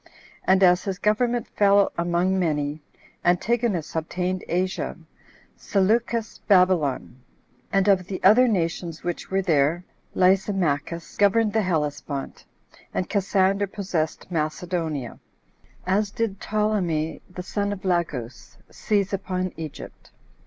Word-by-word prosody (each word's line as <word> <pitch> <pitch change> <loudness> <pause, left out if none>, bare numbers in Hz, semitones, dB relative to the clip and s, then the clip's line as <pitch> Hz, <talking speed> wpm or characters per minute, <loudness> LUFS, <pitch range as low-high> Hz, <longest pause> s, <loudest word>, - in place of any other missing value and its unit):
And 190 +1 +4
as 180 0 +5
his 195 -2 -2
government 235 +3 +1
fell 200 -1 +4
among 175 +2 +1
many, 150 -3 -1 0.4
Antigonus 190 -1 +1
obtained 180 +3 -2
Asia, 185 +2 -1 0.6
Seleucus 220 +3 0
Babylon; 180 - +2 0.5
and 195 0 +2
of 190 -3 +3
the 190 - -4
other 225 +7 +7
nations 170 -5 -2
which 175 -1 -4
were 195 0 0
there, 160 +1 +2 0.3
Lysimachus 180 -4 +1
governed 205 +1 +3
the 220 - +2
Hellespont, 150 -5 -3 0.5
and 185 - -2
Cassander 195 0 +1
possessed 180 -4 -3
Macedonia; 160 -4 -3 0.7
as 200 +3 +1
did 200 -2 -3
Ptolemy 190 -7 -1
the 180 0 -7
son 205 +2 -2
of 195 -1 -6
Lagus 150 -10 -2
seize 205 -2 -1
upon 185 -1 -2
Egypt. 160 -2 -9
185 Hz, 110 wpm, -24 LUFS, 165-200 Hz, 0.7 s, other